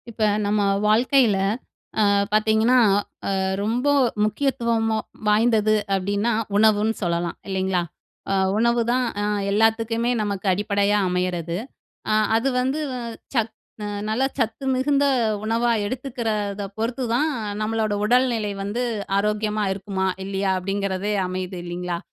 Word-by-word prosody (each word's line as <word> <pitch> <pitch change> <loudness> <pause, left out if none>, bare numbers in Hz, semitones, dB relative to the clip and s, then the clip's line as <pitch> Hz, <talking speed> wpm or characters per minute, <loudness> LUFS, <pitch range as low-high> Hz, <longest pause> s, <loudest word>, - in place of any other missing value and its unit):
இப்ப 225 -1 -9 0.2
நம்ம 205 +1 +1 0.3
வாழ்க்கையில 230 0 +4 0.6
ஆ - - +5 0.3
பார்த்தீங்கன்னா, 220 +3 +3 0.5
ஆ - - 0 0.3
ரொம்ப 240 +5 -1 0.4
முக்கியத்துவம் 230 -1 0 0.4
வாய்ந்தது 215 0 +3 0.2
அப்பிடின்னா, 200 +4 0 0.2
உணவுன்னு 215 +1 +4
சொல்லலாம் 170 -1 -1
இல்லேங்களா! 190 -1 0 0.5
அ - - +2 0.2
உணவுதான் 235 +2 +2 0.2
அ - - 0 0.3
எல்லாத்துக்குமே 225 +2 +2
நமக்கு 200 -1 -3
அடிப்படையா 205 +1 +1
அமையிறது. 180 -2 -1 0.5
அ - - +3 0.2
அது 235 +4 +1
வந்து 265 +4 -1 0.5
சத் 225 -2 0 0.3
அ - - -3 0.2
நல்ல 225 +5 +1
சத்து 230 +2 -1
மிகுந்த 280 +2 +2 0.4
உணவா 230 +2 +1 0.2
எடுத்துக்கிறத 220 -5 -3
பொறுத்துதான் 245 +5 0 0.3
நம்மளோட 215 -1 0
உடல்நிலை 235 -2 +2
வந்து 205 +5 -2 0.4
ஆரோக்கியமா 210 +1 0
இருக்குமா, 190 -1 -3 0.2
இல்லயா 195 0 -1
அப்பிடிங்கிறதே 195 +1 -2
அமையுது 185 0 -4
இல்லேங்களா! 175 0 -4
215 Hz, 110 wpm, -23 LUFS, 200-235 Hz, 0.6 s, ஆ